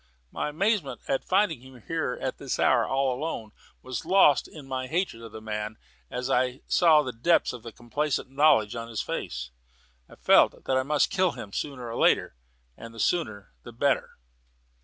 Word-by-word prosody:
My - - -2
amazement 190 -1 0
at 135 - 0
finding 185 - +1
him 130 -3 -15
here 160 -6 -2
at 130 - -4
this 135 - -3
hour, - - +3
and - - -7
alone, 135 -3 -1 0.3
was 130 -1 -5
lost 170 -4 +4
in 150 -4 -12
my 130 -1 -3
hatred 165 -6 -2
of 115 -1 -10
the 110 - -9
man 105 0 -4 0.3
as 125 0 -3
I 125 0 0
saw 160 -4 +5
the 130 - -4
depths 145 +8 +2
of 115 -1 -8
complacent 135 +2 -2
knowledge 135 -7 +4
in 115 0 -5
his 115 -2 -3
face. 60 0 -5 0.6
I - - -14
felt - - +4
that 130 - 0
I 130 - +3
must 145 +2 +1
kill 185 -2 +2
him 100 - -9
sooner 135 -5 -4
or 115 - -5
later, - - +3 0.4
and 115 - -11
the - - -10
sooner 110 - -1
the 120 - -11
better. 140 +4 0
130 Hz, 180 wpm, -27 LUFS, 115-150 Hz, 0.6 s, saw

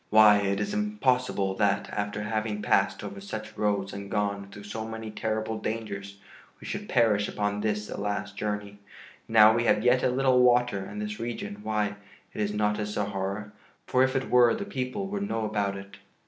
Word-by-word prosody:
Why, 105 -1 +7
it 100 -1 0
is 205 - -2
impossible 130 - +1
that, 100 -2 +1
after 105 0 -3
having 105 0 -2
passed - - +2
over 100 - -7
such 110 +2 -7
roads 100 -2 0
and 100 0 -7
gone 100 -1 -1
through 105 +1 -11
so 110 +2 -5
many 110 0 -6
terrible 110 +1 -2
dangers, 100 -3 -5 0.4
we - - -12
should - - -5
perish 105 -4 +3
upon 105 0 -2
this 105 -1 -1
the - - -6
last 105 0 -3
journey. 105 -1 -4 0.5
Now 110 -1 +7
we 120 +1 +1
have 105 - +3
yet 125 +1 +4
a - - +2
little 130 0 +3
water 125 -4 +4
and 105 +2 -7
this 105 0 -4
region 115 -3 -5
why, 105 -1 -1 0.4
it - - -3
is 105 0 0
not 105 0 0
a 105 - -1
Sahara, 100 0 -3 0.3
for 130 - +2
if 130 0 +3
it 135 - -1
were 120 -2 +6
the 200 - -4
people 130 +3 -3
would 200 +1 -3
know 115 -1 -1
about 100 -2 -1
it." 100 0 -11
105 Hz, 190 wpm, -27 LUFS, 105-115 Hz, 0.5 s, Why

